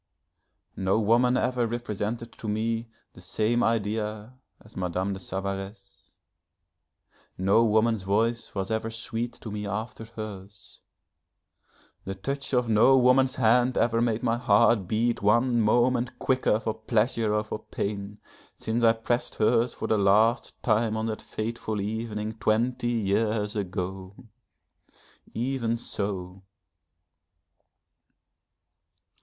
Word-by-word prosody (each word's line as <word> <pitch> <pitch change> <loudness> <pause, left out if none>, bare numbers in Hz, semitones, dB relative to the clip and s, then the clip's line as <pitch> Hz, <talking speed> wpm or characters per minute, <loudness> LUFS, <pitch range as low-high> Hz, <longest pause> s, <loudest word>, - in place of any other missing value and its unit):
No 95 +3 +1
woman 120 +4 +3
ever 125 -2 0
represented 115 0 -4
to 110 - -6
me 115 +2 -1 0.3
the 90 - -14
same 110 +6 0
idea 110 0 -1 0.3
as 110 - -19
Madame 95 +2 -2
de 95 - -6
Savaresse. 95 +1 -6 1.3
No 100 +5 +4
woman's 110 0 +2
voice 110 +5 0
was 95 +1 -3
ever 110 0 -1
sweet 115 +1 -4
to 110 - -9
me 105 0 -4
after 110 +2 -5
hers, 105 -3 -10 1.2
the 95 - -5
touch 135 +8 -4
of 125 -2 +2
no 115 +5 +5
woman's 130 +1 +4
hand 125 +1 +3
ever 115 -1 +2
made 115 -2 0
my 115 +1 +1
heart 115 -5 +3
beat 115 +3 0
one 120 +3 +3
moment 120 +3 +2
quicker 130 -4 +1
for 110 -1 -2
pleasure 110 0 0
or 105 - +1
for 110 - -5
pain, 100 0 -5 0.4
since 115 +2 -2
I 115 -1 +6
pressed 120 +2 -2
hers 115 +2 +2
for - - -5
the 110 -2 +2
last 110 +5 +2
time 110 -1 +1
on 110 - -2
that 110 -1 -3
fateful 110 -1 -4
evening 110 +1 -4
twenty 120 +4 +1
years 105 -1 0
ago. 95 -1 -4 1.2
Even 115 -1 -1
so 95 -4 -4
110 Hz, 120 wpm, -27 LUFS, 105-120 Hz, 1.3 s, I